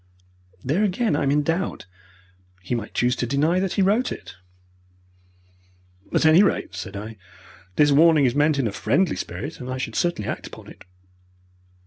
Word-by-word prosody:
"There 155 Hz, +11 st, +1 dB
again 210 Hz, -2 st, 0 dB
I -, -, -1 dB
am 140 Hz, -, +1 dB
in 145 Hz, +1 st, +2 dB
doubt. 165 Hz, -, -2 dB, 0.8 s
He 95 Hz, -, -4 dB
might 115 Hz, -3 st, -4 dB
choose 125 Hz, +1 st, +2 dB
to 120 Hz, -, -2 dB
deny 150 Hz, +7 st, +1 dB
that 190 Hz, -1 st, -1 dB
he 195 Hz, -, +2 dB
wrote 215 Hz, +7 st, +1 dB
it." -, -, -8 dB, 1.8 s
"At -, -, +1 dB
any 160 Hz, +4 st, +7 dB
rate," 200 Hz, -, 0 dB
said 90 Hz, +3 st, -7 dB
I, 110 Hz, +2 st, -8 dB, 0.6 s
"this 145 Hz, -1 st, +4 dB
warning 155 Hz, 0 st, +5 dB
is 120 Hz, -, +2 dB
meant 145 Hz, +1 st, +2 dB
in 135 Hz, -, 0 dB
a -, -, -3 dB
friendly 150 Hz, -, 0 dB
spirit, 150 Hz, +3 st, -6 dB
and 125 Hz, -, -7 dB
I 130 Hz, -, -3 dB
should 120 Hz, -3 st, -4 dB
certainly 170 Hz, -11 st, -1 dB
act -, -, -5 dB
upon -, -, -12 dB
it. -, -, -15 dB
145 Hz, 175 wpm, -23 LUFS, 125-175 Hz, 1.8 s, any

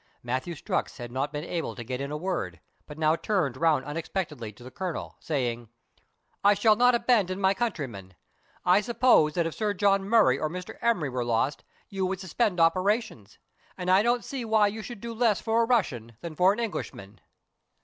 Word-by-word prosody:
Matthew 130 Hz, +8 st, -3 dB
Strux -, -, -3 dB
had 120 Hz, -2 st, -7 dB
not 135 Hz, +3 st, -2 dB
been 150 Hz, 0 st, -4 dB
able 170 Hz, -1 st, -3 dB
to 120 Hz, -, -7 dB
get 125 Hz, +3 st, -4 dB
in 140 Hz, -, -3 dB
a 150 Hz, -, -3 dB
word, 150 Hz, -, -3 dB, 0.3 s
but 150 Hz, -, -10 dB
now 155 Hz, 0 st, +3 dB
turned 165 Hz, -, -1 dB
round 150 Hz, -3 st, +2 dB
unexpectedly 150 Hz, -, -4 dB
to 105 Hz, +4 st, -16 dB
the 130 Hz, -, -10 dB
Colonel, 185 Hz, -5 st, -5 dB
saying, 120 Hz, -6 st, -2 dB, 0.3 s
— -, -, -39 dB
" -, -, -44 dB
I 205 Hz, +1 st, +6 dB
shall 215 Hz, +2 st, +4 dB
not 245 Hz, +2 st, +4 dB
abandon 205 Hz, -6 st, +2 dB
my 190 Hz, 0 st, +3 dB
countryman. 135 Hz, -, -4 dB, 0.5 s
I 180 Hz, +3 st, +5 dB
suppose 235 Hz, -9 st, +3 dB
that 170 Hz, -, +1 dB
if 165 Hz, -, -3 dB
Sir 210 Hz, -2 st, -1 dB
John 195 Hz, 0 st, +3 dB
Murray 210 Hz, -, +4 dB
or 155 Hz, -, -1 dB
Mr. 180 Hz, +2 st, -8 dB
Emery 210 Hz, -12 st, +1 dB
were 125 Hz, -1 st, -2 dB
lost, 120 Hz, +4 st, 0 dB, 0.2 s
you 195 Hz, -1 st, -3 dB
would 190 Hz, 0 st, -3 dB
suspend 190 Hz, +1 st, -1 dB
operations; 185 Hz, -, +1 dB, 0.4 s
and 180 Hz, 0 st, -1 dB
I 190 Hz, +2 st, +6 dB
don't 240 Hz, +2 st, +1 dB
see 270 Hz, -3 st, -4 dB
why 220 Hz, -2 st, +3 dB
you 220 Hz, +2 st, -6 dB
should 225 Hz, -2 st, -9 dB
do 235 Hz, 0 st, -5 dB
less 225 Hz, -3 st, +2 dB
for 225 Hz, +1 st, +1 dB
a -, -, +3 dB
Russian 120 Hz, -, 0 dB
than 170 Hz, -2 st, -6 dB
for 180 Hz, +4 st, +4 dB
an 210 Hz, -, -3 dB
Englishman." 105 Hz, -, -5 dB
180 Hz, 200 wpm, -27 LUFS, 135-210 Hz, 0.5 s, I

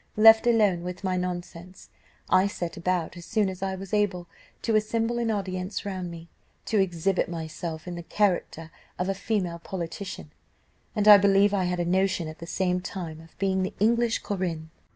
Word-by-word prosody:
Left 225 Hz, +2 st, +8 dB
alone 210 Hz, -7 st, +3 dB
with 180 Hz, +2 st, -6 dB
my 185 Hz, -1 st, 0 dB
nonsense, 180 Hz, 0 st, -5 dB, 0.4 s
I 185 Hz, +1 st, +4 dB
set 175 Hz, -4 st, -4 dB
about, 175 Hz, -1 st, -1 dB
as 175 Hz, -, -9 dB
soon 215 Hz, -3 st, +1 dB
as 185 Hz, -1 st, -8 dB
I 190 Hz, -1 st, -1 dB
was 190 Hz, +1 st, -9 dB
able, 195 Hz, -4 st, 0 dB, 0.4 s
to 225 Hz, -, +1 dB
assemble 225 Hz, +2 st, +1 dB
an 235 Hz, -1 st, 0 dB
audience 190 Hz, -2 st, -3 dB
round 185 Hz, -3 st, -4 dB
me, 170 Hz, 0 st, -9 dB, 0.4 s
to 220 Hz, -, +1 dB
exhibit 185 Hz, 0 st, +1 dB
myself 160 Hz, 0 st, -5 dB
in 180 Hz, -, -4 dB
the 175 Hz, -, -5 dB
character 170 Hz, -4 st, -1 dB, 0.3 s
of 180 Hz, +1 st, -1 dB
a -, -, +2 dB
female 190 Hz, -4 st, -2 dB
politician, 185 Hz, +2 st, -6 dB, 0.6 s
and 210 Hz, -1 st, +1 dB
I 205 Hz, -1 st, +11 dB
believe 200 Hz, +1 st, +4 dB
I 190 Hz, -2 st, +1 dB
had 180 Hz, 0 st, -1 dB
a 175 Hz, -, 0 dB
notion 185 Hz, -1 st, +1 dB
at 155 Hz, 0 st, -9 dB
the 170 Hz, -, -8 dB
same 180 Hz, 0 st, 0 dB
time 165 Hz, -4 st, -6 dB
of 165 Hz, 0 st, -18 dB
being 190 Hz, -1 st, +1 dB
the 185 Hz, -, -3 dB
English 230 Hz, +2 st, +2 dB
Corinne. 170 Hz, -5 st, -3 dB
185 Hz, 185 wpm, -26 LUFS, 175-205 Hz, 0.6 s, I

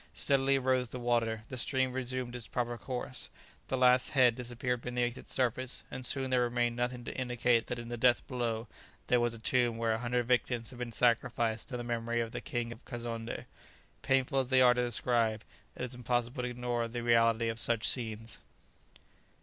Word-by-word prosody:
Steadily 135 Hz, -1 st, +3 dB
rose 130 Hz, -2 st, +1 dB
the 125 Hz, -, -6 dB
water; 115 Hz, -2 st, 0 dB
the 130 Hz, -, -5 dB
stream 130 Hz, 0 st, +1 dB
resumed 130 Hz, -1 st, -2 dB
its 120 Hz, -3 st, -7 dB
proper 120 Hz, -1 st, -2 dB
course; 125 Hz, -1 st, -5 dB, 0.4 s
the 130 Hz, -, -1 dB
last 125 Hz, 0 st, +4 dB
head 125 Hz, -3 st, +5 dB
disappeared 125 Hz, 0 st, -3 dB
beneath 120 Hz, 0 st, -1 dB
its -, -, -7 dB
surface, 130 Hz, 0 st, 0 dB
and 130 Hz, -, -6 dB
soon 130 Hz, +1 st, +2 dB
there 125 Hz, -1 st, +3 dB
remained 120 Hz, -1 st, +1 dB
nothing 125 Hz, 0 st, -2 dB
to -, -, -5 dB
indicate 125 Hz, -2 st, +1 dB
that 125 Hz, -, -3 dB
in 120 Hz, 0 st, -7 dB
the 120 Hz, -, -4 dB
depth 120 Hz, +1 st, +3 dB
below 120 Hz, -3 st, -2 dB, 0.4 s
there 125 Hz, -, +4 dB
was 120 Hz, -1 st, 0 dB
a -, -, -7 dB
tomb 120 Hz, +1 st, +1 dB
where 115 Hz, -1 st, +1 dB
a 110 Hz, -, -2 dB
hundred 120 Hz, 0 st, 0 dB
victims 120 Hz, -1 st, 0 dB
had 125 Hz, -, -11 dB
been 120 Hz, -1 st, -4 dB
sacrificed 115 Hz, -1 st, +1 dB
to 125 Hz, -, -4 dB
the 120 Hz, -, -5 dB
memory 120 Hz, 0 st, -1 dB
of 115 Hz, -1 st, -2 dB
the -, -, -5 dB
King 120 Hz, -1 st, -3 dB
of 120 Hz, +2 st, -11 dB
Kazonndé. 115 Hz, -2 st, -5 dB, 0.6 s
Painful 135 Hz, 0 st, +2 dB
as 130 Hz, -2 st, -1 dB
they 130 Hz, -1 st, +5 dB
are 125 Hz, -1 st, +7 dB
to 125 Hz, -, 0 dB
describe, 115 Hz, -2 st, +1 dB, 0.3 s
it -, -, -5 dB
is 125 Hz, 0 st, -4 dB
impossible 125 Hz, +1 st, -1 dB
to 125 Hz, -, -2 dB
ignore 120 Hz, -1 st, -2 dB
the 120 Hz, +1 st, -5 dB
reality 115 Hz, -1 st, +3 dB
of 115 Hz, 0 st, -2 dB
such 115 Hz, 0 st, +2 dB
scenes. 115 Hz, -3 st, -1 dB
120 Hz, 200 wpm, -32 LUFS, 115-125 Hz, 0.6 s, are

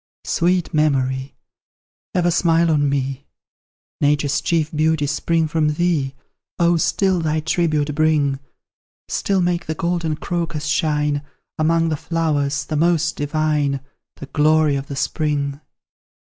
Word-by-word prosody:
Sweet 175 Hz, 0 st, +1 dB
Memory! 135 Hz, -3 st, 0 dB, 0.8 s
ever 175 Hz, -1 st, +2 dB
smile 165 Hz, -1 st, +3 dB
on 145 Hz, -2 st, +2 dB
me; 135 Hz, 0 st, -2 dB, 0.7 s
Nature's 145 Hz, 0 st, +2 dB
chief 160 Hz, -2 st, 0 dB
beauties 155 Hz, -2 st, +1 dB
spring 165 Hz, +1 st, 0 dB
from 150 Hz, -1 st, 0 dB
thee; 155 Hz, -6 st, 0 dB, 0.4 s
Oh, 170 Hz, 0 st, +3 dB
still 190 Hz, +3 st, +1 dB
thy 155 Hz, -1 st, 0 dB
tribute 155 Hz, -2 st, 0 dB
bring 150 Hz, -3 st, +2 dB, 0.7 s
Still 195 Hz, -2 st, 0 dB
make 175 Hz, 0 st, -1 dB
the 160 Hz, -, -2 dB
golden 170 Hz, -1 st, -1 dB
crocus 165 Hz, -2 st, -3 dB
shine 150 Hz, -1 st, 0 dB, 0.4 s
Among 165 Hz, +1 st, +2 dB
the 155 Hz, -, -1 dB
flowers 145 Hz, -3 st, -1 dB
the 155 Hz, -, -3 dB
most 165 Hz, 0 st, +2 dB
divine, 145 Hz, -1 st, 0 dB, 0.4 s
The -, -, -9 dB
glory 155 Hz, +1 st, +3 dB
of 135 Hz, 0 st, -4 dB
the 140 Hz, -, -5 dB
spring. 145 Hz, -1 st, -1 dB
155 Hz, 125 wpm, -20 LUFS, 145-165 Hz, 0.8 s, smile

